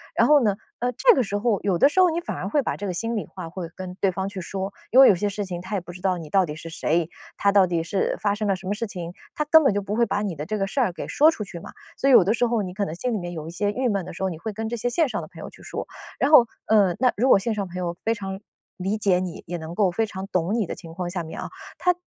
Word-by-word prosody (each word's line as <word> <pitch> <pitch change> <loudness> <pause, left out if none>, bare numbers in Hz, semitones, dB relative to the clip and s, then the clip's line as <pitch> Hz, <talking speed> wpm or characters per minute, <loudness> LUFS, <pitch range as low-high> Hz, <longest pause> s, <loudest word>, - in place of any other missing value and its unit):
然 - - +4
后 295 -3 +6
呢， 205 -3 +2 0.2
呃， 245 +1 0
这 485 - +5
个 265 - +2
时 205 -3 -2
候 210 -2 0
有 190 -3 +1
的 275 - +5
时 355 - 0
候 365 -1 +6
你 330 +1 -1
反 345 - -5
而 195 - -4
会 285 +5 +1
把 - - -2
这 205 - -5
个 185 - -2
心 230 +6 -2
里 210 - -3
话 185 -3 -8
会 175 -2 -6
跟 185 -1 -7
对 195 - +3
方 190 +1 -3
去 195 -1 -6
说， 195 +2 -4 0.2
因 255 - +5
为 270 - +10
有 - - +7
些 205 +3 -1
事 205 +1 -4
情 175 -2 -5
他 190 +3 -4
也 - - +1
不 175 0 -10
知 180 +1 -11
道 185 -1 +1
你 165 -2 -8
到 190 +5 +3
底 150 - -5
是 165 +1 -9
谁， 165 0 0 0.3
他 200 - +3
到 195 -2 +5
底 170 -2 -1
是 170 +4 -1
发 205 -1 +1
生 210 +1 -2
了 195 - +2
什 190 +1 -11
么 195 - -1
事 225 +2 -3
情， 175 -3 -6 0.2
他 300 - -1
根 320 +2 +6
本 270 -8 +3
就 205 - +1
不 200 +2 -3
会 235 +1 +2
把 205 - -1
你 195 -5 -3
的 150 - -5
这 215 - -2
个 195 - 0
事 205 - -3
儿 240 -8 +2
给 175 - -7
说 305 +2 +5
出 320 -10 -2
去 185 -4 -8
嘛。 - - -10 0.3
所 275 - +2
以 - - +6
有 195 - +9
的 200 +5 +2
时 240 +1 +1
候 230 -3 0
你 180 -1 -6
可 205 +2 -2
能 160 - -5
心 245 +7 -2
里 215 - -1
面 175 -1 -5
有 155 -2 -6
一 - - -6
些 205 +4 -1
郁 250 +4 -1
闷 200 -3 0
的 - - -7
时 175 - -5
候， 190 - +1
你 165 -3 -7
会 220 +6 -4
跟 220 +2 -4
这 235 - -3
些 240 +1 -1
线 315 +6 +2
上 250 - -3
的 - - -8
朋 - - -15
友 - - -8
去 - - -17
说， - - -5 0.3
然 280 - +1
后， 245 -6 +8 0.2
嗯， 205 -5 +3
那 255 0 +3
如 250 +5 +2
果 - - +8
线 220 +4 -1
上 200 -2 -3
朋 180 - -12
友 175 -1 -3
非 225 - +2
常 195 -3 -6 0.4
理 195 +4 -1
解 195 -4 +2
你， 180 -2 -5
也 175 - -4
能 160 +1 -7
够 195 -3 +3
非 225 +6 0
常 190 -1 -6
懂 180 0 0
你 225 -3 +1
的 - - -5
情 165 -3 -11
况 180 0 -3
下 175 0 -3
面 160 - -8
啊， - - -5 0.3
他 360 - +3
200 Hz, 365 characters per minute, -24 LUFS, 180-225 Hz, 0.4 s, 为